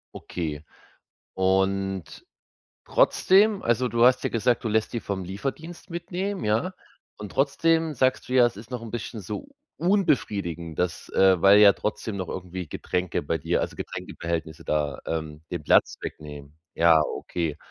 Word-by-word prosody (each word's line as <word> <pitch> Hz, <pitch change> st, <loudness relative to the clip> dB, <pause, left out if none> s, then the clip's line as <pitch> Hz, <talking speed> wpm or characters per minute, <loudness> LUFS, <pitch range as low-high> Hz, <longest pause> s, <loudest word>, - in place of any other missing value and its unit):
Okay. 75 Hz, -4 st, -5 dB, 0.7 s
Und 95 Hz, -2 st, 0 dB, 0.6 s
trotzdem, 200 Hz, +2 st, +3 dB
also, 120 Hz, +2 st, +2 dB
du 115 Hz, 0 st, +1 dB
hast 125 Hz, +1 st, +5 dB
ja -, -, +1 dB
gesagt, 120 Hz, +1 st, +1 dB
du -, -, +2 dB
lässt 110 Hz, 0 st, 0 dB
die 120 Hz, -, -2 dB
vom 100 Hz, -3 st, -4 dB
Lieferdienst 140 Hz, -, -6 dB
mitnehmen, 180 Hz, +3 st, -4 dB
ja? 110 Hz, -, 0 dB, 0.4 s
Und 105 Hz, -2 st, -8 dB
trotzdem 160 Hz, +3 st, +2 dB
sagst 130 Hz, 0 st, +1 dB
du 125 Hz, -, -4 dB
ja, 125 Hz, -2 st, +6 dB
„es 120 Hz, -, -2 dB
ist 110 Hz, +2 st, -11 dB
noch 125 Hz, -2 st, -5 dB
'n 115 Hz, -, -8 dB
bisschen 115 Hz, -1 st, -5 dB
so 105 Hz, -, -6 dB, 0.3 s
unbefriedigend, 100 Hz, -, 0 dB
dass, 90 Hz, -2 st, -2 dB
äh 95 Hz, -2 st, +5 dB
weil 100 Hz, +1 st, +7 dB
ja 105 Hz, -1 st, +9 dB
trotzdem 105 Hz, +1 st, -4 dB
noch 95 Hz, -2 st, -4 dB
irgendwie 90 Hz, -1 st, -6 dB
Getränke 90 Hz, +3 st, -2 dB
bei 75 Hz, +3 st, -1 dB
dir -, -, 0 dB
also, -, -, -4 dB
Getränkebehältnisse 80 Hz, -1 st, -5 dB
da, 75 Hz, -2 st, -1 dB
ähm, 80 Hz, -2 st, -4 dB
den 85 Hz, -3 st, -4 dB
Platz -, -, +4 dB
wegnehmen“. 75 Hz, -1 st, -9 dB, 0.2 s
Ja, 85 Hz, -1 st, +6 dB, 0.2 s
okay, 80 Hz, -4 st, -3 dB
100 Hz, 155 wpm, -25 LUFS, 85-125 Hz, 0.7 s, ja